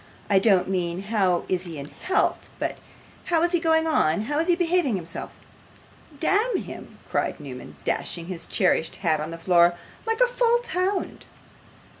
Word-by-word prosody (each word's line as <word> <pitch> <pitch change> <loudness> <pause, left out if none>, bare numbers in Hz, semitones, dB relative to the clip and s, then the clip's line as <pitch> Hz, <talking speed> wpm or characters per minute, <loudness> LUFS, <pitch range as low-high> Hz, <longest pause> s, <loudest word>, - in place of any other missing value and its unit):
I 195 - +6
don't 195 -3 +3
mean 180 -1 -2
how 195 -4 +1
is 185 0 -1
he 165 -3 -7
in 140 +1 -7
health, 380 +2 -1
but - - -3 0.5
how 335 -2 +2
is 345 - +2
he 350 - +3
going 320 -1 +3
on: 205 - +2
how 290 +7 -1
is 330 - +2
he 350 - +5
behaving 345 - +1
himself?' 170 -3 -5 0.9
'Damn 410 +7 +2
him!' - - -8
cried - - -1
Newman, 125 - -9
dashing 170 - -2
his 175 -2 -4
cherished 175 -5 +1
hat 155 -2 +3
on 155 +1 -4
the 165 - -6
floor; 175 0 +4 0.3
'like 450 +1 0
a - - +7
false 480 -1 +1
hound. 370 +2 -1
205 Hz, 170 wpm, -25 LUFS, -, 0.9 s, a